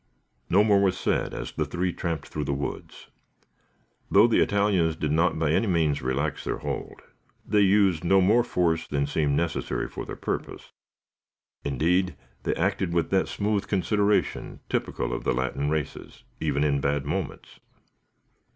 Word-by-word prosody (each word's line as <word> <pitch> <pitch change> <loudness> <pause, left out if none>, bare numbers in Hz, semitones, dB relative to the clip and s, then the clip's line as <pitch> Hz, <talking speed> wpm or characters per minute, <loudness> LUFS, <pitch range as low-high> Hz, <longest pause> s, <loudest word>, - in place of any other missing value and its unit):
No 100 +3 +5
more 100 -2 +4
was 95 -2 +2
said - - 0
as - - -5
the - - -1
three 90 0 -2
tramped 85 -4 -3
through 75 -1 -4
the 70 - -1
woods. 70 0 -6 1.0
Though 105 +3 +6
the 120 - +3
Italians 100 -6 +2
did 75 -2 -2
not 80 +3 +2
by 80 -2 +1
any 110 +7 +2
means 80 -6 +1
relax 70 +4 -2
their - - -2
hold, - - -5 0.4
they 105 0 +3
used 95 -4 +3
no 95 +3 +4
more 105 +6 +4
force 85 -7 0
than 70 -1 0
seemed 70 0 0
necessary 85 -1 -1
for - - -7
their - - -7
purpose. - - -5 0.9
Indeed, 85 +6 +1 0.3
they - - -1
acted 85 - 0
with 85 - 0
that 95 -1 +2
smooth 100 -1 -1
consideration 105 +1 0
typical - - -2
of - - -4
the - - +1
Latin 65 +3 -1
races, 75 -2 -4 0.2
even 75 -2 0
in 70 -2 +1
bad 70 0 0
moments. 80 +1 -5
85 Hz, 160 wpm, -26 LUFS, 75-100 Hz, 1.0 s, Though